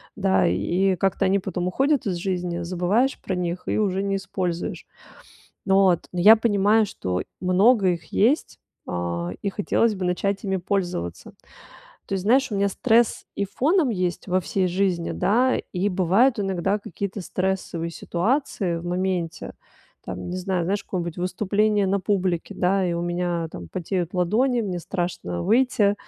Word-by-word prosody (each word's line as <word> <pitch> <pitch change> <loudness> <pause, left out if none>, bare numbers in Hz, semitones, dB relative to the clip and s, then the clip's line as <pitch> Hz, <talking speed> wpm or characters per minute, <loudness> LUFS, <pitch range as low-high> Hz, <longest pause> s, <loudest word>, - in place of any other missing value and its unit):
да, 95 0 +2
и 175 - +1
как-то 195 +1 +1
они 195 +1 +3
потом 180 -2 -3
уходят 270 +8 +1
из 190 - -1
жизни, 180 -1 -2
забываешь 185 +9 0
про 190 - -4
них 180 0 -3
и - - 0
уже 195 -2 0
не 195 0 0
используешь. 180 -3 -4 0.8
Вот. 190 -3 +3
Но 180 - -5
я 210 +5 +9
понимаю, 215 -1 +3
что 90 - -3 0.2
много 190 +3 +4
их 170 -2 -4
есть, 250 +9 +1 0.3
а, 85 0 -3
и 200 - -2
хотелось 210 +2 +1
бы 185 - -4
начать 195 +3 -1
ими 190 -2 -1
пользоваться. 175 - -3 0.7
То - - -3
есть, 190 -1 -3
знаешь, 265 +5 +3
у 205 - -2
меня 200 0 +2
стресс 230 +3 +2
и 200 - 0
фоном 285 - +1
есть 180 -4 -2
во 185 0 +1
всей 185 +1 -1
жизни, 180 -1 0
да, 250 +6 +2 0.2
и 185 +2 0
бывают 200 +6 +3
иногда 195 +1 0
какие-то 200 +1 -5
стрессовые 185 -2 -2
ситуации 190 - -1
в 165 - -9
моменте, 180 -1 -2 0.5
там, - - -6
не 180 - -3
знаю, 185 -1 -1
знаешь, 200 +4 -1
какое-нибудь 175 -2 -4
выступление 205 +3 +1
на 200 +1 +1
публике, 185 -4 -1
да, 190 +1 +1
и 170 - -1
у 170 - -2
меня 175 -1 -2
там 85 -2 -8
потеют 180 - -3
ладони, 235 +8 +2
мне 185 -4 -3
страшно 170 - -3
выйти, 220 -2 +3
190 Hz, 160 wpm, -24 LUFS, 175-205 Hz, 0.8 s, я